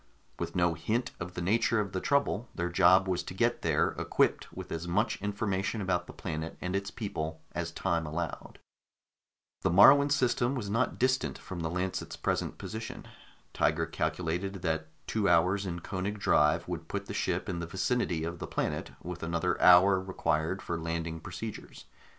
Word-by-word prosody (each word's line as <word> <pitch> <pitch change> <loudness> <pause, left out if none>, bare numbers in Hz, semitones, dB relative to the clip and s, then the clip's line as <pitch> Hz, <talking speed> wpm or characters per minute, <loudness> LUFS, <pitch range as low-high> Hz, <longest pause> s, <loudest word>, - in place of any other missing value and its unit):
With - - -4
no 85 -1 +3
hint 115 +9 -1
of 90 0 -6
the 90 - -3
nature 115 +4 +2
of 100 -3 -2
the 95 - -2
trouble, 125 -5 +1
their 85 0 -1
job 90 +2 +5
was 90 -2 0
to 90 - -8
get 120 +4 +1
there, - - +2
equipped - - +1
with - - -8
as 85 +1 -4
much 100 +6 0
information 100 0 -1
about 90 -3 -1
the - - -8
planet 80 -2 -5
and 90 +1 -3
its 100 0 -1
people 80 -9 -4
as 85 -1 -3
time 85 -2 -1
allowed. 80 +2 -5 1.0
The - - +2
Moruan 140 - +7
system 125 -2 +2
was 105 -6 -3
not 115 +4 +1
distant 130 +1 +1
from 95 -3 -7
the 80 -1 -2
Lancet's 90 +2 -3
present - - -1
location. 110 +1 -6 0.5
Tiger - - +2
calculated 90 +3 -2
that 80 -2 -1 0.2
two 105 -3 +1
hours 90 +4 +3
in 85 -1 -4
Koenig 100 +4 -3
drive 75 -6 +3
would - - -5
put - - -4
the - - -6
ship - - -1
in 85 - -2
the 85 - -4
vicinity 95 - 0
of 85 +1 -4
the - - -5
planet, - - -2
with 90 0 -6
another 85 +2 -1
hour 95 +2 +7
required 85 -1 -1
for 85 -1 -3
landing 80 0 -3
procedures. 95 +6 -8
90 Hz, 175 wpm, -30 LUFS, 85-105 Hz, 1.0 s, Moruan